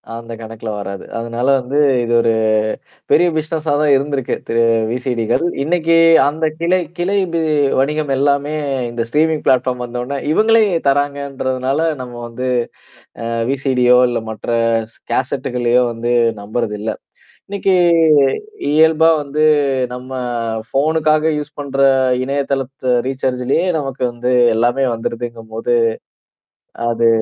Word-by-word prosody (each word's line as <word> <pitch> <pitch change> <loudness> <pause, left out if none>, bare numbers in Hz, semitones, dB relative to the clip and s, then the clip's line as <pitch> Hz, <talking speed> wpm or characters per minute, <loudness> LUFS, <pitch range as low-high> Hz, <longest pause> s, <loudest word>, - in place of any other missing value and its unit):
அந்த 115 0 -8
கணக்குல 110 0 -7
வராது. 100 -1 -6
அதனால 115 +2 -3
வந்து, 130 +3 -4 0.3
இது 120 - -3
ஒரு 115 -1 +2 0.8
பெரிய 175 - +5
பிசினஸா 155 0 -2
தான் 150 -1 +3
இருந்திருக்கு, 140 -1 -1
திரு 115 0 +1 0.3
விசிடிகள். 125 +2 -1 0.2
இன்னைக்கு 165 +1 +1 0.3
அந்த 155 +2 -1
கிளை 175 +2 +2 0.2
கிளை 185 +4 0 0.2
பி 165 - +1 0.4
வணிகம் 150 +1 0
எல்லாமே 140 +2 +1 0.4
இந்த 120 0 -3
ஸ்ட்ரீமிங் 155 +3 +1
பிளாட்ஃபார்ம் 125 -1 +1
வந்த 120 0 -6
உடனே 140 +2 -4
இவங்களே 225 +4 +4 0.3
தராங்கன்றதுனால, 140 -1 -1 0.2
நம்ம 125 -1 -8
வந்து 125 +2 -5 0.8
அ - - -3 0.2
விசிடியோ 130 -2 +3
இல்ல 120 - -1
மற்ற 110 - -9 0.4
ஸ் - - -20 0.2
கேசட்டு்களையோ 125 -1 0
வந்து 120 +1 -2 0.3
நம்புறது 105 +1 -3
இல்ல. 110 +1 -2 0.6
இன்னைக்கு 195 -1 0 0.9
இயல்பா 160 +2 +4
வந்து 145 +2 -2 0.5
நம்ம 125 +1 -9 0.6
ஃபோனுக்காக 155 +2 +1
யூஸ் 150 0 -7
பண்ற 140 -1 -5 0.4
இணையதளத்த 135 -1 -2
ரீசார்ஜ்லயே 130 +4 -1
நமக்கு 135 -3 -5
வந்து 120 +1 -2 0.2
எல்லாமே 120 +4 +1
வந்துருதுங்கும்போது, 115 0 -4 1.2
அது 115 0 +1
135 Hz, 115 wpm, -17 LUFS, 120-150 Hz, 1.2 s, பெரிய